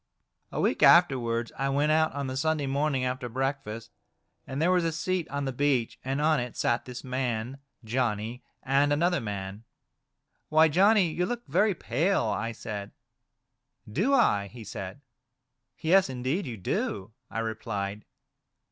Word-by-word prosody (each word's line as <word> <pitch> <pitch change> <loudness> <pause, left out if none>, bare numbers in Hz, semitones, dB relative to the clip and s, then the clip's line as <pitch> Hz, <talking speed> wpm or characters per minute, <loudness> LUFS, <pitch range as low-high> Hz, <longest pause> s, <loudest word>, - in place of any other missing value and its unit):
A - - -3
week - - +1
afterwards, 120 -9 +4
I 135 0 +1
went 145 +2 +2
out 160 0 +3
on 140 -1 -3
the 130 0 -4
Sunday 155 +1 0
morning 135 -1 0
after 125 -1 -3
breakfast, 130 -3 -3 0.6
and 135 - -4
there 170 +4 +3
was 180 -1 +3
a 165 - +1
seat 175 +1 -2
on 140 0 -2
the 135 - -2
beach, 130 -3 0
and 135 +2 -2
on 155 -1 +3
it 125 -1 -5
sat 120 +1 +1
this 125 0 -8
man, 125 0 -2 0.2
Johnny, 115 0 -2 0.2
and 140 +2 +2
another 175 +4 +2
man. 100 -1 -5 0.4
" - - -50
Why, 155 +1 +5
Johnny, 190 +2 +4
you 180 +3 -1
look 240 0 -4
very 210 -2 +2
pale," 160 - +1
I 110 +2 -1
said. 105 -2 -6 0.5
" - - -22
Do 240 +8 +3
I 105 - +3
?" - - -23
he 120 -2 -10
said. 100 +4 -7 0.8
"Yes! 180 0 +4
indeed 130 +8 -2
you 115 -3 -5
do," 95 +1 -2 0.2
I - - -6
replied. 105 -2 -3
135 Hz, 165 wpm, -28 LUFS, 115-160 Hz, 0.8 s, Why